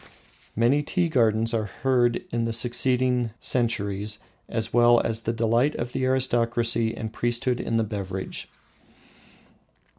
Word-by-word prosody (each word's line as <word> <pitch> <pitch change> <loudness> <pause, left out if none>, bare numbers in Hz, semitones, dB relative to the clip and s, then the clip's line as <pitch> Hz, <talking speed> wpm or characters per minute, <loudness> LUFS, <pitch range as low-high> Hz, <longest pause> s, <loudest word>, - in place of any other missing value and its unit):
Many 120 +6 +3
tea 175 +3 0
gardens 115 -4 +2
are 110 -2 0 0.2
heard 125 -3 +3
of - - -5
in 115 0 -1
succeeding 125 +1 +1
centuries, 105 -4 -1 0.3
as 110 -1 -3
well 120 0 +6
as 115 0 -1
the 115 - -1
delight 115 +5 +1
of 120 +1 -4
the 130 - -1
aristocracy 120 -3 +1
and 110 0 -5
priesthood 120 +1 -1
in 115 - -1
the 115 - +2
beverage. 95 -3 -5
115 Hz, 130 wpm, -25 LUFS, 115-125 Hz, 0.3 s, well